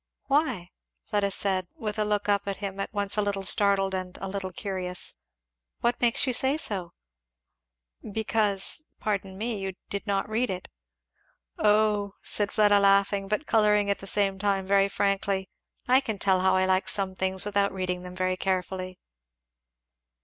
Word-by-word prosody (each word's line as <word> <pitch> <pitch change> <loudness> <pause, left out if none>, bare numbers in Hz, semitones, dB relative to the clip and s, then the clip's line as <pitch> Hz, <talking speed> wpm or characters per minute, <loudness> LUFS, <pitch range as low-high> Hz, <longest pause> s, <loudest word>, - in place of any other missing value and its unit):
"Why?" 260 - 0 0.3
Fleda 205 -1 0
said, 190 -2 0
with 215 -1 -4
a - - +3
look 210 -1 -1
up 200 -1 +1
at 195 - -2
him 195 -1 -5
at 195 - -3
once 205 -1 +1
a - - +3
little 200 -1 -2
startled 195 0 +3
and 185 -1 -4
a 195 - -5
little 190 -1 -4
curious; 180 -2 -3 0.7
"what 240 +1 0
makes 240 +2 +3
you 255 - 0
say 265 +4 +4
so?" 190 - 0 1.2
"Because 215 +3 +1 0.2
pardon 195 -3 -3
me 220 0 -3
you 195 -1 -4 0.2
did 200 +2 -4
not 195 -1 0
read 225 +3 -1
it." 185 -1 -5 0.9
"Oh," 210 -1 +2
said 205 -1 -1
Fleda 205 -1 +4
laughing, 200 0 +3
but 210 +9 -2
colouring 210 -3 +3
at 200 - -2
the 195 - -8
same 195 -1 +1
time 195 -1 0
very 195 0 +3
frankly, 195 -1 -1 0.4
"I 255 +1 +6
can 220 -6 -4
tell 190 -1 +2
how 190 0 +3
I 185 0 +3
like 185 0 +1
some 195 -2 +2
things 190 0 0
without 200 -1 +1
reading 180 -1 -3
them 180 0 -9
very 185 0 -1
carefully." 185 -1 -2
200 Hz, 165 wpm, -27 LUFS, 190-210 Hz, 1.2 s, I